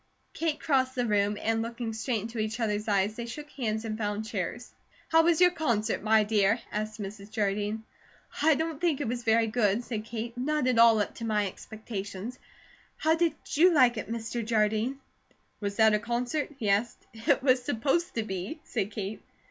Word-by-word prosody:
Kate 320 Hz, -2 st, -1 dB
crossed 260 Hz, -4 st, +1 dB
the 245 Hz, -1 st, 0 dB
room, 205 Hz, -1 st, +1 dB
and 225 Hz, 0 st, 0 dB
looking 230 Hz, 0 st, -4 dB
straight 220 Hz, 0 st, -1 dB
into 230 Hz, +1 st, -5 dB
each 215 Hz, +2 st, -2 dB
other's 210 Hz, -2 st, -1 dB
eyes 200 Hz, 0 st, +1 dB
they 235 Hz, 0 st, -5 dB
shook 300 Hz, +5 st, -8 dB
hands 220 Hz, -4 st, -2 dB
and 215 Hz, 0 st, -4 dB
found 210 Hz, 0 st, -2 dB
chairs. 220 Hz, +3 st, -4 dB, 0.4 s
"How 325 Hz, 0 st, +6 dB
was 330 Hz, -1 st, +3 dB
your 360 Hz, 0 st, +6 dB
concert, 240 Hz, -, 0 dB
my 215 Hz, +1 st, +4 dB
dear?" 210 Hz, +1 st, +2 dB
asked 215 Hz, +1 st, -3 dB
Mrs. 200 Hz, 0 st, -7 dB
Jardine. 210 Hz, 0 st, -1 dB, 0.6 s
"I 315 Hz, 0 st, +5 dB
don't 320 Hz, 0 st, -3 dB
think 335 Hz, -6 st, +1 dB
it 290 Hz, -, -2 dB
was 240 Hz, +1 st, -2 dB
very 225 Hz, 0 st, +4 dB
good," 220 Hz, 0 st, +1 dB
said 220 Hz, -3 st, -4 dB
Kate. 230 Hz, +1 st, -5 dB
"Not 295 Hz, +3 st, 0 dB
at 250 Hz, -2 st, +2 dB
all 230 Hz, -1 st, +7 dB
up -, -, -3 dB
to -, -, -7 dB
my 210 Hz, -2 st, +1 dB
expectations. 210 Hz, +2 st, -6 dB, 0.6 s
How 315 Hz, +1 st, +3 dB
did 330 Hz, -1 st, +1 dB, 0.2 s
you 350 Hz, +5 st, +5 dB
like 255 Hz, -6 st, +5 dB
it, 220 Hz, -2 st, -5 dB
Mr. 230 Hz, +1 st, -3 dB
Jardine?" 220 Hz, +3 st, +1 dB, 0.6 s
"Was 200 Hz, -1 st, -3 dB
that 220 Hz, 0 st, +5 dB
a 210 Hz, -, +3 dB
concert?" 240 Hz, +6 st, -2 dB
he 220 Hz, -, -3 dB
asked. 205 Hz, +4 st, 0 dB
"It 240 Hz, +4 st, +1 dB
was 255 Hz, -2 st, +4 dB
supposed 275 Hz, +9 st, 0 dB
to 225 Hz, -, 0 dB
be," 195 Hz, -, -5 dB
said 205 Hz, -4 st, -2 dB
Kate. 205 Hz, 0 st, -5 dB
225 Hz, 190 wpm, -28 LUFS, 210-255 Hz, 0.6 s, all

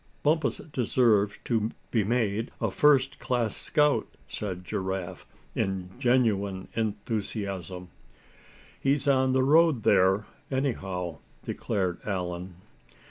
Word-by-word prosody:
"Bumpus 155 Hz, -1 st, +2 dB, 0.2 s
deserves 110 Hz, -4 st, +2 dB
to 110 Hz, -2 st, +1 dB, 0.2 s
be 110 Hz, -3 st, +2 dB
made 110 Hz, 0 st, 0 dB
a -, -, 0 dB
first 135 Hz, -3 st, +3 dB
class 120 Hz, -4 st, 0 dB
scout," 150 Hz, -1 st, +2 dB, 0.2 s
said 95 Hz, -4 st, -5 dB
Giraffe, 95 Hz, -1 st, -4 dB, 0.3 s
in 95 Hz, -2 st, -2 dB
genuine 105 Hz, -7 st, +1 dB
enthusiasm. 100 Hz, -4 st, -3 dB, 0.9 s
"He's 140 Hz, +1 st, +1 dB
on 130 Hz, -1 st, +3 dB
the 130 Hz, 0 st, +3 dB
road 155 Hz, -3 st, +4 dB
there, 95 Hz, +3 st, +4 dB, 0.2 s
anyhow," 95 Hz, -, -2 dB, 0.2 s
declared 95 Hz, -3 st, -2 dB
Allan. 90 Hz, -2 st, -4 dB
105 Hz, 100 wpm, -28 LUFS, 95-130 Hz, 0.9 s, road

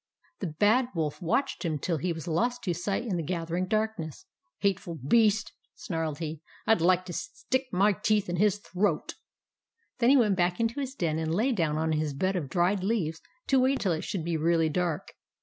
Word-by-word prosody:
The 190 Hz, -, -2 dB
Bad 210 Hz, +11 st, +3 dB
Wolf 155 Hz, +1 st, -2 dB
watched 265 Hz, +11 st, 0 dB
him 160 Hz, -3 st, -1 dB
till 165 Hz, +3 st, -1 dB
he 175 Hz, +5 st, -1 dB
was 160 Hz, -1 st, -6 dB
lost 240 Hz, +9 st, 0 dB
to 180 Hz, -, 0 dB
sight 195 Hz, +6 st, -2 dB
in 195 Hz, -7 st, -1 dB
the -, -, -1 dB
gathering 170 Hz, +2 st, -2 dB
darkness. 215 Hz, -8 st, -2 dB, 0.2 s
" 100 Hz, -, -50 dB
Hateful 190 Hz, -3 st, 0 dB
beast! 215 Hz, -, +2 dB
" -, -, -50 dB
snarled 160 Hz, -4 st, -3 dB
he. 160 Hz, -1 st, -5 dB
" -, -, -25 dB
I'd 220 Hz, -6 st, +4 dB
like 185 Hz, +1 st, +3 dB
to 175 Hz, -, -6 dB
stick 265 Hz, -, -2 dB
my 200 Hz, +3 st, +4 dB
teeth 210 Hz, +1 st, +1 dB
in 175 Hz, 0 st, -2 dB
his 205 Hz, +2 st, +3 dB
throat! 205 Hz, 0 st, -1 dB, 0.4 s
" 460 Hz, -, -48 dB
Then 235 Hz, 0 st, +4 dB
he 280 Hz, -, +7 dB
went 210 Hz, -6 st, +3 dB
back 175 Hz, -1 st, +1 dB
into 230 Hz, +4 st, 0 dB
his 270 Hz, -1 st, -4 dB
den 160 Hz, -, -1 dB
and 160 Hz, 0 st, -1 dB
lay 235 Hz, +8 st, +2 dB
down 165 Hz, -9 st, 0 dB
on 160 Hz, 0 st, 0 dB
his 155 Hz, -2 st, -1 dB
bed 190 Hz, +6 st, 0 dB
of 155 Hz, -7 st, -2 dB
dried 185 Hz, +2 st, +1 dB
leaves 185 Hz, -7 st, -1 dB, 0.2 s
to 270 Hz, -, +3 dB
wait 260 Hz, +1 st, +2 dB
till 190 Hz, -, +1 dB
it 160 Hz, -, -1 dB
should 185 Hz, -7 st, -3 dB
be 170 Hz, -1 st, 0 dB
really 165 Hz, 0 st, +2 dB
dark. 170 Hz, -1 st, -2 dB
180 Hz, 220 wpm, -28 LUFS, 160-215 Hz, 0.4 s, he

